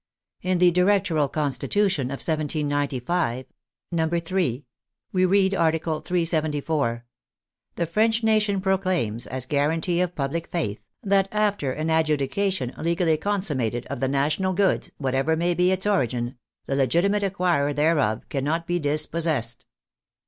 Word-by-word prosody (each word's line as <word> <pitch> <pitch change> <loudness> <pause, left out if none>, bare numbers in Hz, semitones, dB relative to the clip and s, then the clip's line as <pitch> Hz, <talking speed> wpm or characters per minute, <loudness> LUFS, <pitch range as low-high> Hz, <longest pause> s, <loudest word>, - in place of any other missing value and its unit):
In 185 0 0
the 175 0 +5
Directoral 180 -5 +2
Constitution 150 +2 0
of 135 +1 -1
1795 145 -3 -1 0.5
(III.) 165 -4 -1 0.5
we 185 -1 +2
read. 195 +1 +3
Article 160 -3 +1
374: 155 -7 0 0.4
" - - -57
The 170 - 0
French 220 +6 +1
nation 215 -3 +2
proclaims, 185 - 0
as 130 -1 -3
guarantee 160 +6 0
of 180 -1 -1
public 150 +4 -2
faith, 110 - -2 0.2
that 195 -1 +2
after 205 -10 0
an 155 +4 -2
adjudication 155 0 0
legally 170 0 +1
consum 200 -8 -1
mated, 120 0 -2
of - - -4
the 135 - 0
national 150 +8 0
goods, 195 +1 +1
whatever 135 +3 0
may 175 +2 +1
be 180 +1 +2
its 190 +1 0
origin, 125 - 0 0.3
the 135 - -2
legitimate 170 - +2
acquirer 180 -7 +1
thereof 145 -8 +1
cannot 150 +5 -1
be 175 +1 -1
dispossessed." 150 -5 -1
160 Hz, 130 wpm, -24 LUFS, 140-185 Hz, 0.5 s, the